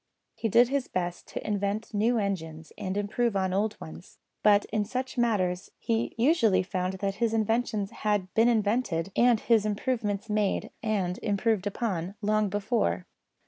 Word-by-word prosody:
He 225 - -2
did 235 +4 +5
his 275 -1 -1
best 175 -1 -3
to - - -6
invent 205 +2 -2
new 225 +4 +2
engines 160 -7 -3
and 190 +1 -4
improve 210 +2 0
on 190 -1 0
old 210 +2 0
ones; 80 +1 -11 0.2
but 205 -1 +5
in 215 -1 +2
such 255 +5 -4
matters 195 -7 0
he 230 0 -1
usually 225 - +3
found 185 -1 -2
that 195 +1 -3
his 225 -1 +2
inventions 220 -2 0
had 205 -3 -1
been 225 +1 +4
invented, 205 -6 0
and 240 -2 +4
his 225 -1 +3
improvements 215 -1 -1
made 210 -2 0
and 195 -5 -1
improved 205 -1 0
upon, 195 -4 -2
long 215 0 +1
before. 195 - 0
205 Hz, 155 wpm, -28 LUFS, 190-225 Hz, 0.2 s, did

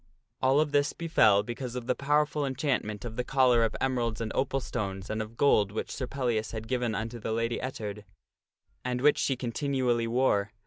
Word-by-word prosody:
All 130 +2 +4
of 150 -1 +1
this 145 0 +2
befell 110 -12 +4
because 120 +2 -5
of 125 -2 -4
the 125 - +2
powerful 150 +2 +1
enchantment 130 -6 -2
of 115 0 -6
the 125 - 0
collar 125 -3 +4
oi 115 - +3
emeralds 120 -4 0
and 115 -1 -3
opal 135 0 0
stones 100 -6 -4
and 110 0 -1
of 110 +2 -8
gold 105 -8 +4
which 110 - -4
Sir 130 - -4
Pellias 120 -5 -1
had 110 0 -5
given 125 -3 -1
unto 115 +3 -4
the 110 - -4
Lady 115 +1 -1
Ettard, 105 -5 -5 0.8
and 125 0 -2
which 150 +2 +4
she 135 - +1
continually 125 -1 0
wore. 115 -4 +1
120 Hz, 190 wpm, -29 LUFS, 110-135 Hz, 0.8 s, All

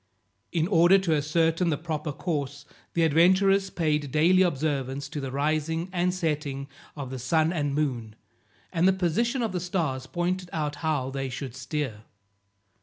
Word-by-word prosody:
In 165 -1 +1
order 175 0 +6
to 190 -4 +1
ascertain 165 +3 +1
the 150 - 0
proper 155 -1 -3
course, 145 -2 -3 0.3
the 170 - +3
adventurers 190 +5 +4
paid 150 -5 -1
daily 175 +6 +4
observance 140 -5 0
to 150 -1 -5
the 135 -1 -4
rising 155 +4 -1
and 180 0 +1
setting 150 -6 -2 0.3
of 140 -3 -6
the 130 - -5
sun 160 +6 +2
and 145 -4 -1
moon, 120 -8 -2 0.6
and 170 +2 +3
the 190 - +5
position 235 - 0
of 225 - -1
the 180 - -2
stars 165 -8 -2
pointed 180 +1 -2
out 150 -2 -2
how 145 -4 -1
they 135 0 -3
should 130 0 -6
steer. 130 -4 -4
155 Hz, 160 wpm, -27 LUFS, 140-175 Hz, 0.6 s, order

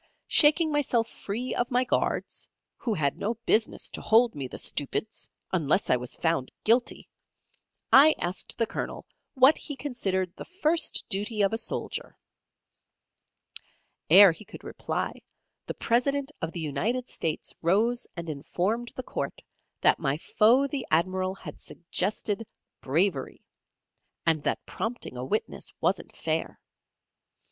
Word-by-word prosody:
Shaking 310 +1 +5
myself 255 -6 +1
free 235 +6 -4
of 245 0 -1
my 250 0 +2
guards 255 - -2 0.3
who 225 -4 -2
had 140 -5 -1
no 225 +3 -1
business 220 0 +2
to - - -5
hold 230 +2 +4
me, 140 -3 -5
the - - -9
stupids! 205 +9 -3 0.2
unless 170 +1 +1
I - - +6
was 125 0 -4
found 165 -6 -1
guilty 235 +3 +1 0.9
I 295 +4 +8
asked 180 +2 -3
the 230 - +2
Colonel - - -5 0.3
what 265 +4 +6
he 290 - -5
considered 195 -10 -2
the - - -8
first 340 -3 +1
duty 210 +2 0
of 195 - +2
a - - +1
soldier? 225 - -4 1.9
'Ere 200 -2 +9
he 165 - -10
could - - -12
reply, - - -4 0.5
the - - -4
President 275 +4 0
of 165 - -2
the 175 - -6
United 200 - -1
States 160 -2 -3
rose 220 +8 +2
and 170 0 -5
informed 185 +10 -2
the 255 - -5
court - - -4 0.4
that - - +4
my 140 -2 0
foe 230 - +3
the 280 -2 -3
Admiral 185 +3 +1
had 155 -6 -10
suggested 205 +5 -2 0.3
"Bravery," 155 0 0 0.8
and 160 -2 +3
that - - -1
prompting 230 - -4
a 125 - -5
witness 210 +12 -3
wasn't - - -1
fair. - - -2
215 Hz, 135 wpm, -27 LUFS, 170-245 Hz, 1.9 s, Ere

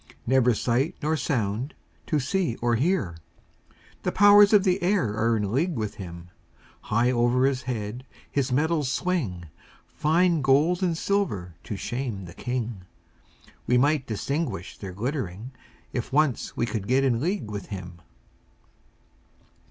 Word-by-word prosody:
Never 125 -2 +3
sight 130 +10 0
nor 155 +2 +1
sound 120 -2 -2 0.3
to 155 - +1
see 155 - 0
or 120 0 0
hear; 120 - 0 0.8
The - - -1
powers 205 0 +7
of 210 -3 +6
the 185 0 +1
air 175 - +1
are 115 +1 +2
in 100 -2 -2
league 165 +7 +1
with 110 -3 -3
him; 85 -1 -9 0.5
High 120 +3 +2
over 120 +1 +3
his 135 -1 +1
head 120 -1 -4 0.3
his 135 -3 0
metals 150 0 +1
swing, 130 - -1 0.4
Fine 165 +1 +2
gold 150 +7 +3
and 175 -3 +1
silver 135 - -1
to 105 - -4
shame 120 -2 -4
the 85 - -10
king; 120 -6 -4 0.8
We 125 - +4
might 145 +1 +2
distinguish 115 - -3
their 95 -2 -8
glittering, 115 - -4 0.4
If 120 0 -3
once 145 -2 +1
we - - +1
could 110 -4 -4
get 130 +2 +3
in 120 -3 +1
league 160 - -2
with 100 -2 -5
him. 90 -4 -8
125 Hz, 145 wpm, -26 LUFS, 105-155 Hz, 0.8 s, powers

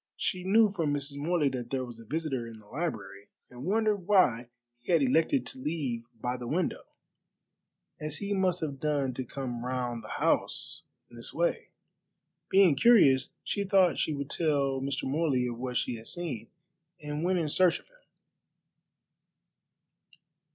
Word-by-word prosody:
She 185 -2 -1
knew 215 +4 +5
from 165 -7 -1
Mrs. 140 0 -3
Morley 160 0 +1
that 125 -2 -5
there 130 -1 -1
was 120 -2 -11
a - - -11
visitor 135 -2 -2
in 115 -1 -10
the 110 - -17
library, 105 - -5 0.2
and 125 +1 -9
wondered 210 -1 +1
why 125 - +4 0.3
he 120 - -5
had 165 -4 +4
elected 160 - +2
to 265 - -6
leave 135 - -3
by 125 +2 -2
the 120 -1 -7
window, 170 +6 -1 1.1
as 150 -1 -4
he 200 +4 -2
must 185 -2 +1
have 140 -4 -3
done 145 -3 0
to 130 - -3
come 125 -2 -5
round 125 -2 -3
the - - -9
house - - 0 0.3
in 120 - -13
this 115 - -7
way. 170 +1 0 0.8
Being 190 -4 +6
curious, 140 - +5
she 200 - -1
thought 190 -2 +3
she 155 - 0
would 140 0 -5
tell 140 -5 +1
Mr. 140 0 -2
Morley 135 -3 +1
of 120 -1 -4
what 125 -1 -2
she 120 - -1
had 110 - -10
seen, 165 -11 -3 0.5
and 150 0 -4
went 185 +1 +2
in 165 -3 0
search 175 +3 +4
of - - -22
him. - - -25
145 Hz, 165 wpm, -29 LUFS, 125-175 Hz, 1.1 s, Being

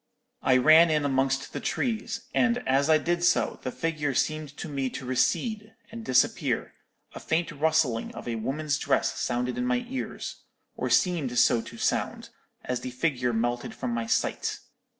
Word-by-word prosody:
"I 130 -1 +4
ran 155 +6 +7
in 150 -2 +1
amongst 135 0 0
the - - -3
trees; 230 -1 -2
and 245 -1 +1
as 140 +3 +2
I 155 - +7
did 170 +3 -1
so, 175 0 +2
the 130 - -4
figure 150 -3 -2
seemed 155 0 -1
to - - -5
me 135 -3 -2
to 130 +1 -7
recede, 210 - 0 0.2
and 230 0 -7
disappear; 130 - +1 0.4
a - - -7
faint 165 +1 -1
rustling 150 -6 +1
of - - -8
a 120 - -1
woman's 145 +6 -1
dress 140 - +1
sounded 125 - -1
in 250 - 0
my 250 -1 0
ears, 260 +1 -5 0.4
or - - -2
seemed 155 -9 +2
so 120 -1 +4
to 115 +1 -11
sound, - - -1 0.3
as 125 -1 -2
the 130 - -4
figure 125 -1 0
melted 120 +1 -2
from - - -3
my 115 -1 -2
sight. - - -1
145 Hz, 170 wpm, -27 LUFS, 125-170 Hz, 0.4 s, ran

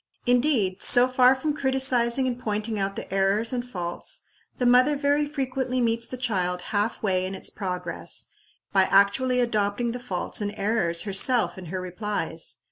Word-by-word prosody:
Indeed, 245 -7 +1
so 245 0 +6
far 255 0 +4
from 295 +3 -2
criticising 265 -2 +1
and 250 -1 -2
pointing 215 -1 -3
out 195 0 -2
the - - -7
errors 195 +5 +1
and 245 -1 -2
faults, 175 -8 -5 0.3
the 250 - -1
mother 250 +4 +4
very 290 +1 +1
frequently 260 -3 -3
meets 230 -1 0
the 255 - -7
child 185 -8 -1
half 210 +3 -1
way 185 -3 +1
in 190 +1 -4
its 190 - -3
progress, 180 -3 -2 0.5
by 190 -1 +4
actually 250 +7 +3
adopting 225 0 0
the 245 - -6
faults 195 -3 -2
and 205 0 -3
errors 195 -5 +1
herself 215 +5 +4
in 190 -2 -10
her 185 +3 -5
replies. 180 - -4
225 Hz, 165 wpm, -25 LUFS, 195-255 Hz, 0.5 s, so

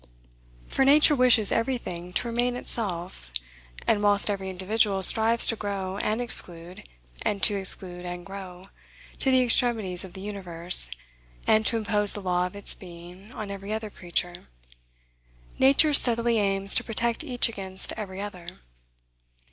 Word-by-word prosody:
For - - -1
Nature 295 +3 +5
wishes 250 -5 +3
every 250 +3 -1
thing 180 -5 -9
to 240 - -2
remain 240 +1 -2
itself; 180 - -5 0.6
and, 215 -2 +1
whilst 205 0 +1
every 190 -1 -5
individual 195 +1 -1
strives 225 +4 +5
to 225 - 0
grow 195 -2 -5
and 215 +2 -2
exclude, 175 - -3 0.3
and 200 -1 -3
to 210 - +6
exclude 185 -2 +3
and 175 0 -8
grow, 190 -2 -11 0.5
to 270 - +1
the 260 -1 +3
extremities 225 -7 +1
of 185 -2 -11
the 190 - -10
universe, 180 - +4 0.6
and 215 0 +2
to 230 - +2
impose 210 -2 -1
the - - -6
law 180 -1 -1
of 180 - -14
its 200 - 0
being 180 +3 -14
on 210 -2 -7
every 200 +1 -8
other 215 -1 -5
creature, 175 -1 -5 1.1
Nature 280 +3 +4
steadily 235 -3 +3
aims 195 -1 +3
to - - +1
protect 230 +3 -3
each 250 -5 0
against 190 -4 -4
every 195 -3 -8
other. 185 -4 -8
200 Hz, 150 wpm, -25 LUFS, 185-230 Hz, 1.1 s, to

